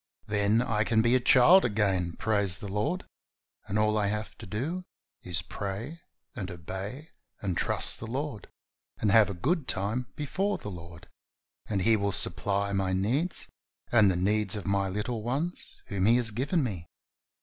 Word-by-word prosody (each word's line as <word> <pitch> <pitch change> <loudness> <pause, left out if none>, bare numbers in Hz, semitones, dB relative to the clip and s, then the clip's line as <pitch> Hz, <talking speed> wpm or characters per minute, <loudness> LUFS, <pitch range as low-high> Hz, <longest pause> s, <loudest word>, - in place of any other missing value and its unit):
Then 105 +2 +2
I 110 -3 0
can 110 0 +2
be 120 +1 +3
a 130 - +5
child 130 +9 +6
again, 95 -6 0
bless 100 -3 +2
the 105 - -7
Lord! 105 - -2 0.6
and 100 - -2
all 105 0 +2
I 100 - +1
have 105 +1 -3
to - - -9
do 145 - -3 0.4
is 90 -4 -2
to - - -25
pray 110 +12 -5 0.4
and 100 -5 -5
obey 95 - -7 0.3
and 95 -4 -2
trust - - +4
the - - -7
Lord, 130 -3 -4 0.5
and 105 - +1
have 110 -1 +6
a 100 - -4
good 145 - -1
time 110 +6 -2
before 190 +8 -1
the 105 - -7
Lord, 85 -1 -11 0.6
and 100 -3 -1
He 115 +2 +4
will 100 -1 0
supply 100 +1 +1
my 95 -1 0
needs 125 - -1 0.4
and 110 -4 +6
the 95 - +1
needs 105 +3 +1
of 105 - -6
my 100 0 0
little 105 +4 -3
ones 140 +10 -3
whom 100 -1 -1
He 115 - +6
has 120 -2 +2
given 140 - 0
me. 90 -9 -4
105 Hz, 175 wpm, -28 LUFS, 100-125 Hz, 0.6 s, child